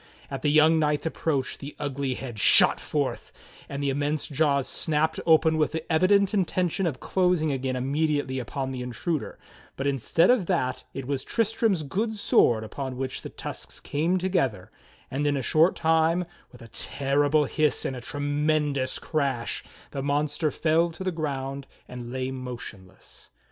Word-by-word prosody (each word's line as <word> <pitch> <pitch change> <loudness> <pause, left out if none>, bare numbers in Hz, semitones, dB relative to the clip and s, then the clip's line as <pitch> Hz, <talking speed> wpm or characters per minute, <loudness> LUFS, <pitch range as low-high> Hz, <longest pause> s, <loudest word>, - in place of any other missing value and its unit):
At - - -4
the 150 - +2
young 155 +2 +5
knight's 150 0 +1
approach 150 -4 -1
the 145 +1 -8
ugly 140 -2 -2
head 120 -5 -7
shot - - +6
forth, - - -2 0.4
and 140 +1 -4
the 140 - +1
immense 145 +2 -1
jaws 140 -2 +1
snapped 160 0 0
open 160 0 +5
with 150 0 +1
the 160 -1 -2
evident 195 +4 +4
intention 185 -2 +1
of 135 -6 -3
closing 180 -5 +1
again 130 -1 -2
immediately 140 0 0
upon 135 +2 -4
the 130 -1 -5
intruder, 130 +6 -3 0.4
but 135 - -4
instead 140 - +3
of 225 -9 +2
that 130 -9 -1
it 135 -1 -4
was 140 0 -2
Tristram's 225 -5 +1
good 215 +10 -2
sword 120 - +3
upon 130 +3 -5
which 130 0 -4
the - - -7
tusks - - -7
came 165 +6 0
together, 135 - -1 0.4
and 145 +3 0
in 145 -1 +1
a 135 - -2
short 160 +8 +4
time, 165 +2 +2 0.3
with 125 - -14
a - - -11
terrible 145 +5 +1
hiss 150 0 0
and 130 - -2
a 125 - -7
tremendous 145 0 0
crash, 135 -6 -2 0.3
the 135 - -4
mon 145 +2 +1
ster 150 +2 -1
fell 165 +3 +2
to 170 +3 -8
the 185 - 0
ground 140 -4 -4 0.2
and 120 -1 -8
lay 130 0 -2
motionless. 120 -7 -9
145 Hz, 165 wpm, -26 LUFS, 130-160 Hz, 0.4 s, shot